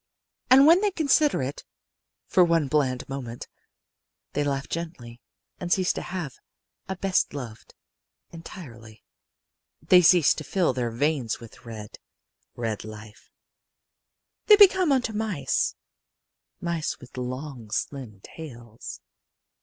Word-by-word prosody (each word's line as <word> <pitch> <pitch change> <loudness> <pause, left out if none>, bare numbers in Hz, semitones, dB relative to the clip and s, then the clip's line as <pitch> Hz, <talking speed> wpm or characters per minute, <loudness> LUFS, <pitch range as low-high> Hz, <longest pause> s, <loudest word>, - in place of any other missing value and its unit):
And 270 +2 +8
when 335 +5 +7
they 420 - +3
consider 300 - +2
it 135 +3 -5 0.6
for 180 - +4
one 165 -4 +2
bland 130 -3 0
moment 125 -4 -6 0.9
they 145 - 0
laugh 140 -1 -2
gently 130 -9 -6 0.4
and 175 -1 -5
cease 185 -1 +3
to - - -4
have 175 -7 -6 0.5
a 190 - -2
best 190 -4 0
loved, 120 -6 -8 0.6
entirely; 120 - -11 0.8
they 180 -1 +6
cease 175 -2 +6
to 155 - -7
fill 175 -3 +1
their 120 -2 -1
veins 130 -1 -1
with 115 0 -14
red, 110 -2 -9 0.6
red 115 -3 -3
life; 110 0 -12 1.2
they 425 - +10
become 375 -4 +6
like 275 - +5
unto 220 - -8
mice 210 -11 -1 0.8
mice 170 -2 -2
with 130 -3 -15
long 130 -1 -6
slim 110 -4 -4
tails. 120 -8 -10
145 Hz, 120 wpm, -26 LUFS, 120-180 Hz, 1.2 s, they